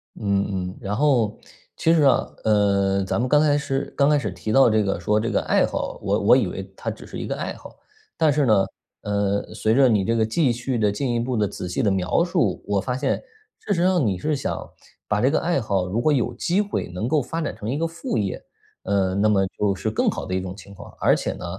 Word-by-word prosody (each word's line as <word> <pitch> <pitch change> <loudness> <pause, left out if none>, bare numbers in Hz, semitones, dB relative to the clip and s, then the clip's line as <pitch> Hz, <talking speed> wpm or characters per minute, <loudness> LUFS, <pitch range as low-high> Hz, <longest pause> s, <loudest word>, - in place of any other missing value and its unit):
嗯 100 -2 -1
嗯， - - -17
然 100 -1 -3
后， 120 -5 +2 0.4
其 165 - +2
实 160 - +4
啊， 135 -3 +4 0.2
呃， 100 -2 +2
咱 95 - -1
们 125 +1 0
刚 150 - +5
开 145 -1 +3
始 140 -1 -3
刚 140 0 +3
开 150 - +4
始 105 -9 -2
提 95 +4 -5
到 135 +1 +6
这 110 -1 +3
个 100 -1 -1
说 105 0 +1
这 115 +2 -1
个 - - +1
爱 - - +3
好， - - -4
我 - - 0
我 - - +5
以 - - +1
为 - - -5
它 - - -4
只 - - -8
是 - - -8
一 - - -5
个 - - -2
爱 - - -4
好。 - - -13 0.4
但 155 -2 +3
是 145 0 +2
呢， 105 -5 +4 0.4
呃， 100 -1 -1
随 110 +1 +1
着 135 0 +6
你 105 -5 +2
这 115 +4 0
个 110 -1 +2
继 130 +4 +1
续 120 +2 -2
地 105 -2 +2
进 125 +4 -2
一 120 - 0
步 120 0 -2
地 105 -1 +2
仔 90 -2 -6
细 90 - -1
的 100 - +3
描 95 - +1
述， 165 - 0
我 100 -1 0
发 125 +2 -2
现 - - 0 0.4
事 205 - -2
实 170 - +1
上 180 -7 +3
你 95 -4 0
是 150 +10 -1
想 135 - -4 0.4
把 105 0 0
这 130 - +4
个 155 - +2
爱 170 -6 0
好， 100 -4 0
如 110 +6 -1
果 155 - +3
有 125 -3 +1
机 175 - 0
会 205 - -3
能 90 +6 -3
够 150 +2 +2
发 165 +6 -4
展 155 - -3
成 110 0 -6
一 135 - -1
个 165 - 0
副 165 -7 -4
业。 100 -3 -2 0.4
呃， 95 -2 +1
那 100 +2 +2
么 100 -2 +3
就 100 -2 +1
是 110 +3 -3
更 - - +1
好 - - -4
的 95 - -5
一 95 - +1
种 95 0 -6
情 100 0 -13
况。 - - -11
而 - - +5
且 - - -1
呢， - - -8
110 Hz, 280 characters per minute, -23 LUFS, 100-140 Hz, 0.4 s, 到